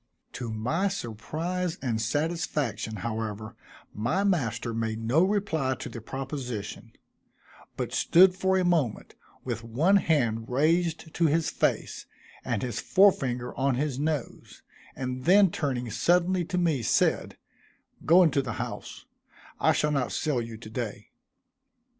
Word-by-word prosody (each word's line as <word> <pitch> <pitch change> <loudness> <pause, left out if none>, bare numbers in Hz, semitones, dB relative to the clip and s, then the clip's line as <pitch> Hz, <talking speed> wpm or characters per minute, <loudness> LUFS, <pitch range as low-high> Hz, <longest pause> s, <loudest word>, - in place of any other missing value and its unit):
To 120 - -5
my 125 - 0
surprise 170 - -3
and 115 -4 -1
satisfaction, 145 - -1
however, 110 -1 -4 0.4
my 120 - 0
master 125 - 0
made 110 -1 -2
no 120 +9 +2
reply 185 -9 0
to - - -7
the 115 - -8
proposition; 130 -4 -6 0.8
but - - -3
stood 180 +2 +5
for 190 0 +1
a 185 - +1
moment, 160 -11 0 0.3
with 120 -2 -4
one 150 - +3
hand 120 - +1
raised 160 +4 +1
to 170 - +2
his 160 +2 +1
face - - -1 0.4
and 100 - -2
his 120 -3 -3
fore 195 +10 +5
finger 125 -6 -4
on 135 -1 +1
his 135 0 -2
nose, 150 -3 -4 0.3
and 130 -1 -4
then 195 +1 +6
turning 125 -7 -2
suddenly 175 - +2
to 180 - -3
me, 165 -7 +1
said, - - +1 0.7
"Go 175 +4 +6
into 145 -4 +3
the 120 -4 -4
house; - - -6 0.5
I - - +4
shall 150 - +1
not 135 -4 0
sell 145 -6 0
you 115 -1 -7
to 110 - -11
day." 110 -2 -5
135 Hz, 140 wpm, -27 LUFS, 115-170 Hz, 0.8 s, then